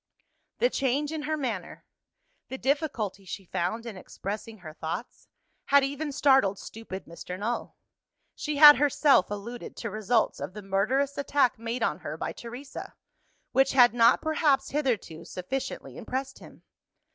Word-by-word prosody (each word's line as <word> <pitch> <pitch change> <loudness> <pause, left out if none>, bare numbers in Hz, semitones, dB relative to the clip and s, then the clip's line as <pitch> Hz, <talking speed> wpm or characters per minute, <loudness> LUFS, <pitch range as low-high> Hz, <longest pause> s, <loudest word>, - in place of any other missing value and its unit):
The - - +2
change 280 +2 0
in 315 -1 -3
her 310 +1 -2
manner, 230 - -4 0.6
the 265 - -5
difficulty 265 - -1
she 190 +1 -7
found 185 +7 -2
in 230 -3 -6
expressing 210 +4 -6
her 160 -5 -10
thoughts, 160 +10 -6 0.4
had 280 0 +5
even 285 +2 -2
startled 265 -8 +3
stupid 195 -4 -8
Mr. 175 +2 -8
Null. 225 +5 -3 0.6
She 300 -1 -3
had 295 -1 +11
herself 285 - +4
alluded 210 +4 -7
to 230 - -5
results 215 +2 +1
of 185 - -6
the 210 - -7
murderous 250 +10 0
attack 275 -4 +2
made 230 +1 -3
on 150 - 0
her 150 +2 -6
by - - -3
Teresa, 245 +4 -9 0.6
which 270 0 +3
had 245 -4 +6
not 230 -1 +4
perhaps 295 -4 +2
hitherto 235 - -1
sufficiently 250 +9 -5
impressed 265 +1 -4
him. - - -15
245 Hz, 145 wpm, -28 LUFS, 200-280 Hz, 0.6 s, had